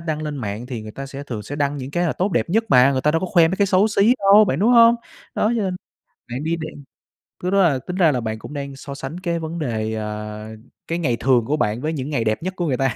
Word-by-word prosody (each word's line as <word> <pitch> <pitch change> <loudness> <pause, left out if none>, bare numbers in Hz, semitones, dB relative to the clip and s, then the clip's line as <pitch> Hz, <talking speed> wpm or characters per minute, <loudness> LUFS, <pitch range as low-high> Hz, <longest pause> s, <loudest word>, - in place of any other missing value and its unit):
đăng 155 -2 -3
lên 150 -1 -4
mạng 110 -1 -5
thì 120 -4 -6
người 110 - -8
ta 135 0 -7
sẽ 135 +1 -8
thường 110 -5 -5
sẽ 145 +8 -7
đăng 145 -1 0
những 135 -1 -6
cái 175 +4 0
là - - 0
tốt 190 +1 -1
đẹp 120 +3 0
nhất 225 +4 +2
mà, 130 +1 +6
người 130 - 0
ta 150 - +2
đâu 165 +2 +1
có 185 - -2
khoe 170 -2 +4
mấy 185 - -2
cái 200 - +2
xấu 195 +3 +3
xí 210 +4 +4
đâu 200 +2 +6
bạn, 150 -8 -1
đúng 220 +6 +4
không? 230 -1 +7 0.4
Đó, 215 +3 +1
cho 220 - 0
nên 185 -2 -2 0.6
bạn 130 +4 -4
đi 165 +2 0
đem 155 -3 -8 0.6
thứ 180 - 0
đó 200 0 +4
là 145 -6 +2
tính 180 +8 -6
ra 170 -5 +4
là 125 -3 -1
bạn 110 -1 -4
cũng 145 - -10
đang 140 -1 -5
so 140 +1 -8
sánh 140 +5 -6
cái 170 -2 -2
vấn 165 +1 -5
đề, 110 -6 -2
ờ, 105 0 -5 0.4
cái 165 - -1
ngày 125 -8 0
thường 125 -4 +3
của 150 +4 0
bạn 110 -3 -1
với 155 +2 -2
những 140 -1 -4
ngày 130 -6 0
đẹp 110 +5 -1
nhất 185 +1 -3
của 175 -3 -2
người 130 -3 0
ta. 135 -3 0
145 Hz, 295 wpm, -21 LUFS, 125-175 Hz, 0.6 s, không